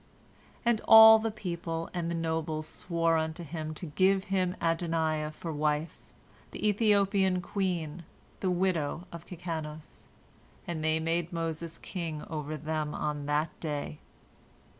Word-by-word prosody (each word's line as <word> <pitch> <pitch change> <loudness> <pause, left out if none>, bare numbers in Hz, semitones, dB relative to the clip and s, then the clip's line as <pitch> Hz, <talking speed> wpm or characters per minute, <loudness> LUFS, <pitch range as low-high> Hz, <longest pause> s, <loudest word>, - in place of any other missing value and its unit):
And 235 -2 +3
all 220 0 +10
the 225 +1 -1
people 170 -5 -4
and 170 -2 -2
the 170 - -2
nobles 160 -1 -2
swore 165 0 0
unto 160 +2 -2
him 155 0 -5
to 175 - -6
give 190 +5 +2
him 185 -1 +1
Adoniah 165 -2 0
for 160 +1 -6
wife, 150 +2 -1 0.5
the - - -2
Ethiopian 200 -3 +3
queen, 175 -3 -2 0.4
the 190 - 0
widow 175 -3 0
of 170 0 -9
Kikanos. 160 -3 -7 0.6
And 160 -3 -4
they 160 0 +2
made 165 +1 -1
Moses 165 -1 -4
king 165 -5 -5
over 155 -1 -3
them 155 -1 -3
on 150 -1 -3
that 150 +2 +1
day. 150 -1 -4
165 Hz, 135 wpm, -30 LUFS, 155-180 Hz, 0.6 s, all